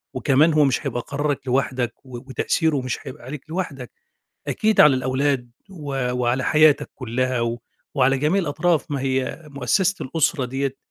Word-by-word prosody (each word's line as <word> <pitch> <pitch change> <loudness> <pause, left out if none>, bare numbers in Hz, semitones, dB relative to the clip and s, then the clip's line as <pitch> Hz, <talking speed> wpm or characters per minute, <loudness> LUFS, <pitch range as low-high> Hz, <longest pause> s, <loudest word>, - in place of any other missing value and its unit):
وكمان 150 +3 +3
هو 150 -1 +5
مش 135 +2 0
هيبقى 120 -2 -2
قرارَك 140 -1 -2
لوحدَك 125 -1 0
و 130 -2 -8
وتأثيره 140 +4 0
مش 125 -2 -3
هيبقى 135 +1 -9
عليك 145 +3 -8
لوحدَك، 150 -8 -4 0.6
أكيد 220 0 +3
على 150 -3 +7
الأولاد 130 -1 -1 0.2
و 140 -8 -3
وعلى 125 +1 0
حياتك 150 0 +4
كُلّها 130 0 -1
و 115 0 -2 0.4
وعلى 135 -1 +3
جميع 155 +8 +1
الأطراف، 165 0 0
ما 140 -2 -2
هي 130 +3 -1
مؤسسة 170 +9 0
الأسرة 145 0 0
ديّة 135 +1 -2
135 Hz, 155 wpm, -22 LUFS, 130-150 Hz, 0.6 s, على